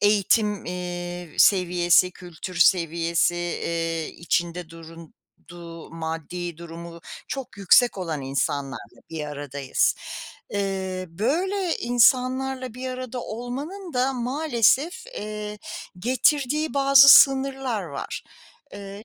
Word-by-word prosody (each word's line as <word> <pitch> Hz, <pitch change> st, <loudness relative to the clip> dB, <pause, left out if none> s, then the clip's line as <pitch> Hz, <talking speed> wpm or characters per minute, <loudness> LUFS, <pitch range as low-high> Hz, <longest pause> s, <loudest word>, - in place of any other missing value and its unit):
eğitim, 210 Hz, 0 st, +2 dB
eee, 175 Hz, -1 st, -5 dB
seviyesi, 180 Hz, -1 st, +4 dB
kültür 180 Hz, +1 st, -9 dB
seviyesi, 170 Hz, -1 st, +2 dB
eee, 165 Hz, -1 st, -2 dB
içinde 170 Hz, 0 st, -2 dB
durduğu 165 Hz, +1 st, -13 dB
maddi 165 Hz, +1 st, -5 dB
durumu 170 Hz, 0 st, -9 dB, 0.3 s
çok 270 Hz, -5 st, -6 dB
yüksek 200 Hz, +4 st, +4 dB
olan 165 Hz, -5 st, -3 dB
insanlarla 135 Hz, 0 st, -3 dB
bir 160 Hz, -2 st, -4 dB
aradayız. 145 Hz, -2 st, -1 dB, 0.6 s
Eee, 190 Hz, -2 st, -3 dB
böyle 340 Hz, -, -1 dB
insanlarla 255 Hz, +1 st, +2 dB
bir 255 Hz, +1 st, -5 dB
arada 255 Hz, -1 st, -5 dB
olmanın 280 Hz, -, -6 dB
da 255 Hz, +2 st, +1 dB
maalesef, 265 Hz, -, +1 dB
eee, 210 Hz, -, -6 dB, 0.4 s
getirdiği 285 Hz, +6 st, +1 dB
bazı 275 Hz, 0 st, +7 dB
sınırlar 270 Hz, -5 st, +5 dB
var. 160 Hz, -6 st, -6 dB, 0.5 s
Eee, 200 Hz, +1 st, -9 dB
195 Hz, 95 wpm, -24 LUFS, 170-255 Hz, 0.6 s, bazı